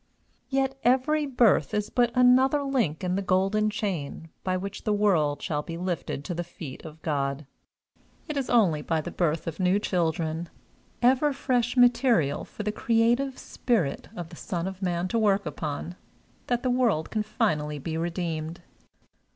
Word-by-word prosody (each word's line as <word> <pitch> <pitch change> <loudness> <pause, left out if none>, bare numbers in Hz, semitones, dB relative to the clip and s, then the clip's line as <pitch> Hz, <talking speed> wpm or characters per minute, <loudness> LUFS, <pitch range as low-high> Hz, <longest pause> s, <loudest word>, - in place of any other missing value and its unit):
Yet 270 0 0
every 285 +5 +2
birth 235 - +3
is 210 -1 -1
but 240 -1 +3
another 260 +3 +5
link 235 - 0
in 180 0 0
the 195 - 0
golden 195 +3 +2
chain 180 -7 -4
by 185 -1 0
which 195 +1 -6
the 215 - 0
world 175 -9 +2
shall 150 -1 -1
be 165 +2 -7
lifted 175 -5 -3
to 180 - -3
the 175 +1 -3
feet 165 -5 -9
of 160 0 -11
God. 140 -1 -1 0.8
It 305 - -4
is 275 -2 -2
only 190 -11 +3
by 160 +1 0
the - - -6
birth 165 -2 0
of 165 +1 -5
new 185 +1 +3
children, 165 -4 -1 0.5
ever 265 +4 +4
fresh 250 -3 0
material 240 - +4
for 210 - -7
the 210 - -1
creative 235 +5 +1
Spirit 210 - -1
of 170 -2 -5
the 170 - -11
Son 170 +1 -3
of 190 0 -7
Man 175 -1 0
to 230 - +1
work 200 -3 +2
upon, 150 +3 -4 0.5
that 245 0 0
the 255 - +1
world 235 -11 +1
can 215 - 0
finally 155 -9 -1
be 160 +3 -4
redeemed. 165 -1 -3
190 Hz, 165 wpm, -27 LUFS, 160-240 Hz, 0.8 s, another